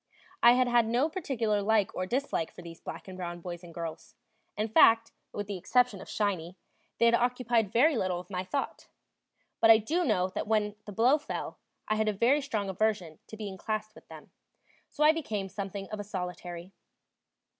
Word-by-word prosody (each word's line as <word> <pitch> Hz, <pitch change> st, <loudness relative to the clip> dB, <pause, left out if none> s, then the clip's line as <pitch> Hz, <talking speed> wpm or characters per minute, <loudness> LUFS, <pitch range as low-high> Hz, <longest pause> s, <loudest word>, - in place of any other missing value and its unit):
I 235 Hz, -, +8 dB
had 250 Hz, 0 st, +3 dB
had 240 Hz, -2 st, +3 dB
no 245 Hz, +7 st, +2 dB
particular 235 Hz, -, -1 dB
like 210 Hz, -1 st, +2 dB
or 185 Hz, -, -3 dB
dislike 250 Hz, -, -1 dB
for 180 Hz, -, -12 dB
these 165 Hz, -1 st, -11 dB
black -, -, -8 dB
and 190 Hz, -, -8 dB
brown 175 Hz, -1 st, -5 dB
boys 175 Hz, 0 st, -7 dB
and 175 Hz, -, -11 dB
girls; 165 Hz, -1 st, -7 dB, 0.4 s
in 215 Hz, +1 st, 0 dB
fact, 225 Hz, +1 st, +5 dB, 0.2 s
with 205 Hz, -, -4 dB
the 200 Hz, -1 st, -4 dB
exception 245 Hz, +1 st, +1 dB
of -, -, -11 dB
"Shiny," 185 Hz, -4 st, -2 dB, 0.4 s
they 235 Hz, -, +3 dB
had 235 Hz, -, +5 dB
occupied 240 Hz, -3 st, +1 dB
very 275 Hz, +7 st, +4 dB
little 185 Hz, -5 st, -1 dB
of 180 Hz, -, -11 dB
my 180 Hz, -1 st, -2 dB
thought; 230 Hz, +10 st, -4 dB, 0.7 s
but 225 Hz, -, +5 dB
I 225 Hz, -, +10 dB
do 315 Hz, +12 st, 0 dB
know 185 Hz, -, +1 dB
that 185 Hz, -, -4 dB
when 210 Hz, -1 st, +1 dB
the 210 Hz, -, -7 dB
blow 245 Hz, +9 st, +4 dB
fell, -, -, -6 dB, 0.3 s
I 215 Hz, -, +1 dB
had 220 Hz, 0 st, +1 dB
a -, -, 0 dB
very 245 Hz, +8 st, +3 dB
strong 220 Hz, -8 st, -2 dB
aversion 190 Hz, -5 st, -1 dB
to 220 Hz, -, -10 dB
being 200 Hz, -3 st, -6 dB
classed 215 Hz, -1 st, -3 dB
with -, -, -17 dB
them. -, -, -13 dB, 0.6 s
So 300 Hz, -, -1 dB
I 305 Hz, -, +8 dB
became 215 Hz, -12 st, -3 dB
something 195 Hz, 0 st, -5 dB
of 215 Hz, -, -4 dB
a -, -, -3 dB
solitary. 180 Hz, -2 st, -6 dB
210 Hz, 200 wpm, -29 LUFS, 185-235 Hz, 0.7 s, I